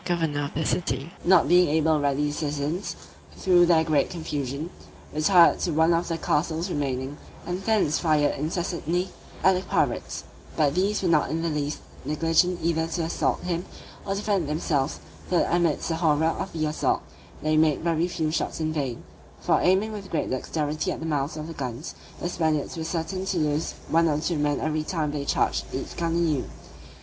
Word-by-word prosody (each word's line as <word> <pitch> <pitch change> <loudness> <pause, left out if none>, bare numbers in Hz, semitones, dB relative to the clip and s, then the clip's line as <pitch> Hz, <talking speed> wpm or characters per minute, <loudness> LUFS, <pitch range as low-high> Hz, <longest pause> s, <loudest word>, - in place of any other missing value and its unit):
The - - -7
governor 150 -4 -1
of 140 - -8
the 160 +1 -1
city, 140 -2 -1
not 180 -1 +5
being 180 -2 +5
able 160 +1 +3
to 155 - +2
rally 145 +1 +1
the 145 - -1
citizens, 150 +5 -2 0.4
through 175 -2 +5
their 165 -2 +5
great 150 -3 +2
confusion, 150 -2 -4 0.4
retired 170 +3 +5
to 170 - -1
one 160 +2 +4
of 170 +1 0
the 165 - -1
castles 165 +3 0
remaining, 135 -1 -2 0.3
and 180 +2 -3
thence 205 -8 +2
fired 155 -3 +2
incessantly 175 +3 -2 0.3
at 190 - +6
the 185 - 0
pirates: - - -1 0.3
but 145 -3 +3
these 195 +4 +1
were - - +2
not 155 -3 +3
in 165 +1 -1
the 170 - 0
least 150 0 -2 0.2
negligent 165 +3 +2
either 165 -1 +1
to 165 +1 -2
assault 165 - 0
him, 175 -1 -2 0.4
or 195 - -2
defend 200 -6 0
themselves, 150 -2 0 0.3
so 180 - +2
that 170 - +2
amidst 170 -3 +1
the 165 - 0
horror 160 -2 +2
of 165 +4 -1
the 155 -1 -1
assault, 155 0 0 0.4
they 155 0 +2
made 155 -2 +3
very 170 0 +1
few 160 -3 -1
shots 165 - -2
in 155 0 -1
vain; 135 -6 -3 0.4
for - - +2
aiming 190 +4 +3
with 200 -3 -7
great 165 - -1
dexterity 155 +6 -1
at - - -4
the 160 - -5
mouths 150 -1 -1
of 155 - -5
the 165 - -7
guns, 130 0 -5 0.3
the - - -2
Spaniards 160 -4 0
were 165 - -4
certain 170 +3 -3
to 190 -1 -1
lose 150 0 0
one 165 +1 +3
or 150 -2 +1
two 160 0 -1
men 145 -1 +1
every 155 0 0
time 155 -2 -2
they 145 -1 -3
charged - - +1
each - - -5
gun 165 -1 -1
anew. 160 -6 +1
160 Hz, 195 wpm, -26 LUFS, 150-175 Hz, 0.4 s, at